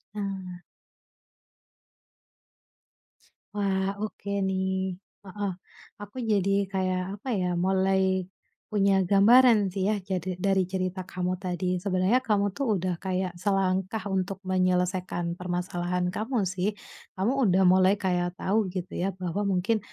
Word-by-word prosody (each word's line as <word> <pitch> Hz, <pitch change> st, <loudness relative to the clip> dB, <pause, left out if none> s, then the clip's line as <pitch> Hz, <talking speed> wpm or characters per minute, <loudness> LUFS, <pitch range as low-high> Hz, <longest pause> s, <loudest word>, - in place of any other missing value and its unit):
Nah. 190 Hz, -3 st, -5 dB, 2.9 s
Wah, 195 Hz, -1 st, 0 dB
oke 205 Hz, -1 st, -5 dB, 0.2 s
nih, 190 Hz, -1 st, -1 dB, 0.3 s
heeh, 200 Hz, 0 st, -3 dB, 0.5 s
aku 205 Hz, +5 st, -10 dB
jadi 200 Hz, -1 st, +2 dB, 0.2 s
kayak 185 Hz, -1 st, 0 dB, 0.2 s
apa -, -, -11 dB
ya, 180 Hz, -, 0 dB, 0.2 s
mulai 190 Hz, -1 st, +2 dB, 0.5 s
punya 195 Hz, -2 st, +3 dB
gambaran 215 Hz, +1 st, +6 dB
sih 190 Hz, +1 st, -1 dB
ya, 215 Hz, -, +2 dB
jadi 185 Hz, -1 st, -3 dB
dari 195 Hz, -2 st, +2 dB
cerita 185 Hz, 0 st, -3 dB
kamu 185 Hz, 0 st, -2 dB
tadi, 180 Hz, -1 st, -1 dB
sebenarnya 190 Hz, +5 st, +2 dB
kamu 210 Hz, -5 st, +1 dB
tuh 275 Hz, +7 st, -3 dB
udah 180 Hz, -1 st, -2 dB
kayak 185 Hz, -1 st, -2 dB
selangkah 195 Hz, +1 st, 0 dB
untuk 190 Hz, 0 st, -2 dB
menyelesaikan 180 Hz, -1 st, 0 dB
permasalahan 180 Hz, 0 st, -2 dB
kamu 225 Hz, +1 st, -1 dB
sih, 185 Hz, +3 st, -1 dB, 0.4 s
kamu 195 Hz, +6 st, +1 dB
udah 190 Hz, 0 st, +4 dB
mulai 185 Hz, +1 st, +5 dB
kayak 180 Hz, -3 st, -1 dB
tahu 210 Hz, +1 st, 0 dB
gitu 185 Hz, 0 st, -5 dB
ya 190 Hz, +1 st, -1 dB
bahwa 185 Hz, +2 st, -2 dB
mungkin, 195 Hz, +4 st, +1 dB
190 Hz, 120 wpm, -27 LUFS, 185-200 Hz, 2.9 s, gambaran